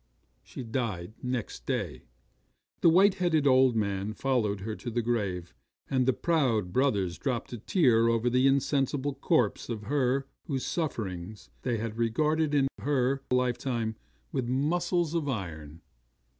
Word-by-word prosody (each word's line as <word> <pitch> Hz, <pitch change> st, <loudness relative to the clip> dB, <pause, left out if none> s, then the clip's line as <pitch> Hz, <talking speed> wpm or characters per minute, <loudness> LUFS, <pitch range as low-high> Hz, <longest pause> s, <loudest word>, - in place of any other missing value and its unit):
'She -, -, -8 dB
died 110 Hz, -6 st, -3 dB
next 125 Hz, -3 st, -4 dB
day. -, -, -2 dB, 0.8 s
The 170 Hz, -, +6 dB
white 190 Hz, +4 st, +6 dB
headed 160 Hz, -5 st, +2 dB
old 130 Hz, -2 st, +5 dB
man 100 Hz, -1 st, -1 dB
followed 110 Hz, -7 st, 0 dB
her 110 Hz, +2 st, -4 dB
to 120 Hz, -, -6 dB
the 120 Hz, 0 st, -1 dB
grave, 100 Hz, -, -2 dB, 0.4 s
and 130 Hz, -2 st, +2 dB
the -, -, +6 dB
proud 125 Hz, -, +1 dB
brothers 100 Hz, -9 st, +1 dB
dropped 125 Hz, -3 st, -2 dB
a 120 Hz, -, -5 dB
tear 115 Hz, -, +3 dB
over 115 Hz, +1 st, +1 dB
the 125 Hz, +2 st, +4 dB
insensible 140 Hz, 0 st, +1 dB
corpse 125 Hz, -5 st, +1 dB
of 110 Hz, -3 st, -4 dB
her 135 Hz, +1 st, +1 dB, 0.2 s
whose 135 Hz, -5 st, -2 dB
sufferings 105 Hz, -, -4 dB
they 120 Hz, -3 st, -1 dB
had 110 Hz, +1 st, -4 dB
regarded 150 Hz, +6 st, +1 dB
in 135 Hz, -1 st, +4 dB
her 135 Hz, -1 st, +1 dB
lifetime 125 Hz, -2 st, 0 dB, 0.4 s
with 125 Hz, -2 st, -1 dB
muscles 170 Hz, +5 st, +1 dB
of 160 Hz, -4 st, -1 dB
iron. 85 Hz, -, -5 dB
125 Hz, 145 wpm, -29 LUFS, 110-140 Hz, 0.8 s, The